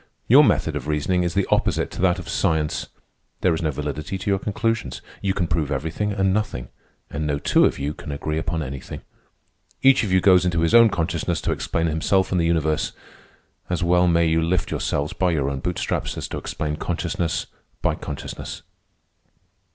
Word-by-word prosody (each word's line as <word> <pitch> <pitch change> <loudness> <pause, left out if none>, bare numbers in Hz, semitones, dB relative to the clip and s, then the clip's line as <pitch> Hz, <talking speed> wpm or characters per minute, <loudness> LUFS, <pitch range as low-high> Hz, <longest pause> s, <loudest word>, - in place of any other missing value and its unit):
"Your - - +8
method 80 - +2
of 75 -1 -4
reasoning 75 +4 +1
is 85 0 -1
the 100 - +2
opposite - - +1
to - - -6
that 90 0 +3
of 90 - -8
science. 80 -5 0 0.5
There 90 - +3
is 80 - -2
no 80 - 0
validity 75 +4 -4
to 95 +2 -2
your 95 - +2
conclusions. 110 - -2 0.2
You 95 -1 0
can 90 - +1
prove 80 -3 -1
everything 80 +9 -2
and 95 -2 +1
nothing, 100 - -2 0.4
and 75 0 -2
no 70 -1 0
two - - +3
of - - +1
you 70 +2 -2
can 75 - -8
agree 75 +2 -2
upon 80 0 -2
anything. 65 -1 -7 0.8
Each 135 -2 +6
of 105 - -2
you 95 - +5
goes 90 -1 +5
into 85 -2 +1
his 85 - +1
own 115 -1 +8
consciousness 85 -2 -1
to - - -1
explain 85 - -1
himself 85 +4 +1
and 90 -2 +2
the 85 - +2
universe. 80 -2 0 0.8
As 90 0 -1
well 90 +1 +4
may 85 -1 +3
you 80 0 +2
lift 85 +2 0
yourselves 70 +1 -1
by 90 - +1
your 70 -5 0
own 70 - -3
bootstraps - - -2
as - - -4
to - - -4
explain 75 0 -3
consciousness 85 +1 -2 0.4
by - - +2
consciousness." 70 - -7
85 Hz, 190 wpm, -23 LUFS, 75-95 Hz, 0.8 s, Your